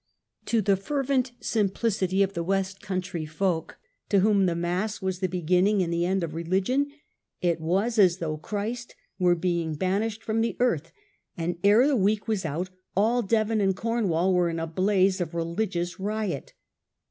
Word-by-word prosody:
To 230 -2 +2
the 195 0 +3
fervent 265 +3 0
simplicity 200 -3 +1
of 195 0 -2
the 170 -2 -2
west 195 +1 -1
country 185 -5 -3
folk, 165 +1 -2 0.3
to 200 -2 +4
whom 200 -2 +4
the 170 - 0
mass 180 +5 -1
was 190 -1 -2
the 185 -1 0
beginning 185 +3 +2
and 170 -1 -2
the 170 +1 +1
end 190 0 0
of 160 -2 -4
religion, 190 - 0 0.5
it 170 -2 0
was 200 +8 0
as 185 -3 +5
though 155 -3 -3
Christ 215 +8 -4 0.2
were 180 -1 +4
being 170 -2 -1
banished 205 +6 -1
from 225 0 0
the 230 - -1
earth, 165 - +1 0.5
and 170 +1 -2
ere 210 +5 +6
the 290 - +2
week 210 0 +1
was 215 -5 -1
out 170 +5 -3 0.3
all 230 +4 +3
Devon 220 0 +1
and 195 -1 +2
Cornwall 195 -5 +1
were 175 -1 +3
in 165 0 -3
a 165 - -1
blaze 185 +2 +2
of 170 -1 -4
religious 175 +1 -2
riot. 205 -6 -3
190 Hz, 170 wpm, -26 LUFS, 175-215 Hz, 0.5 s, ere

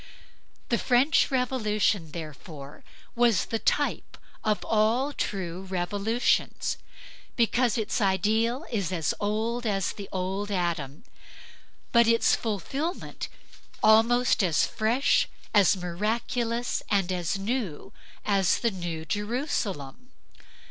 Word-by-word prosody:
The 235 - +2
French 260 +6 +3
Revolution, 215 - +1
therefore, 150 -3 -9 0.3
is 235 -6 +3
the 225 - -2
type - - 0 0.3
of 215 -1 0
all 225 +6 +2
true 185 -6 -3
revolutions, 200 +6 0 0.6
because 240 0 +2
its 220 +2 -1
ideal 220 - +1
is 200 -7 -1
as 165 -4 0
old 225 +3 -1
as 195 -2 0
the 200 -2 -8
Old 190 +2 -2
Adam, 170 -7 -2 0.9
but 235 -1 +5
its 230 0 +4
fulfilment 265 - -4 0.5
almost 230 +3 +5
as 170 -5 +3
fresh, 230 +5 +2 0.2
as 200 -2 +5
miraculous, 230 +6 -1
and 195 -3 +1
as 180 +1 -1
new 200 - -3 0.3
as 195 -3 +3
the 235 - 0
New 170 -4 -5
Jerusalem. 210 - -3
210 Hz, 105 wpm, -27 LUFS, 185-235 Hz, 0.9 s, but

